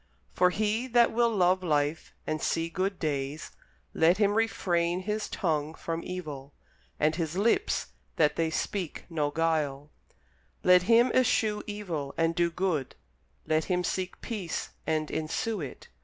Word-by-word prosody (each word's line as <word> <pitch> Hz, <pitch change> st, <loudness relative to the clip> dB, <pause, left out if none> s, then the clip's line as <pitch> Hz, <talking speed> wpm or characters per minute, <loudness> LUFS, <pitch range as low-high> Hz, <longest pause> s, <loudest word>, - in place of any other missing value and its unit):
For 180 Hz, 0 st, +4 dB
he 215 Hz, +5 st, 0 dB
that 240 Hz, -1 st, +4 dB
will 235 Hz, +1 st, +3 dB
love 185 Hz, -3 st, +3 dB
life, 150 Hz, -2 st, 0 dB
and 155 Hz, 0 st, -2 dB
see 165 Hz, 0 st, 0 dB
good 185 Hz, +3 st, -1 dB
days, 145 Hz, -1 st, -3 dB, 0.4 s
let 170 Hz, +3 st, +4 dB
him 205 Hz, -1 st, +3 dB
refrain 180 Hz, -5 st, +1 dB
his 210 Hz, +2 st, -2 dB
tongue 155 Hz, -3 st, -1 dB
from 165 Hz, 0 st, -4 dB
evil, 150 Hz, -7 st, -6 dB, 0.5 s
and 155 Hz, +1 st, +2 dB
his 165 Hz, 0 st, -2 dB
lips 235 Hz, -, +1 dB, 0.3 s
that 150 Hz, -2 st, +3 dB
they 165 Hz, -1 st, +1 dB
speak 175 Hz, +1 st, -3 dB
no 150 Hz, -3 st, 0 dB
guile: 150 Hz, -2 st, -1 dB, 0.7 s
Let 180 Hz, 0 st, +7 dB
him 235 Hz, +2 st, +6 dB
eschew 220 Hz, -4 st, +2 dB
evil, 175 Hz, -10 st, -4 dB
and 165 Hz, 0 st, +2 dB
do 170 Hz, 0 st, +2 dB
good; 170 Hz, -6 st, -1 dB, 0.5 s
let 155 Hz, 0 st, +1 dB
him 180 Hz, -1 st, 0 dB
seek 185 Hz, 0 st, -3 dB
peace 200 Hz, -8 st, -4 dB, 0.2 s
and 155 Hz, -1 st, 0 dB
ensue 175 Hz, +6 st, -2 dB
it. 140 Hz, -, -8 dB
170 Hz, 145 wpm, -29 LUFS, 155-205 Hz, 0.7 s, Let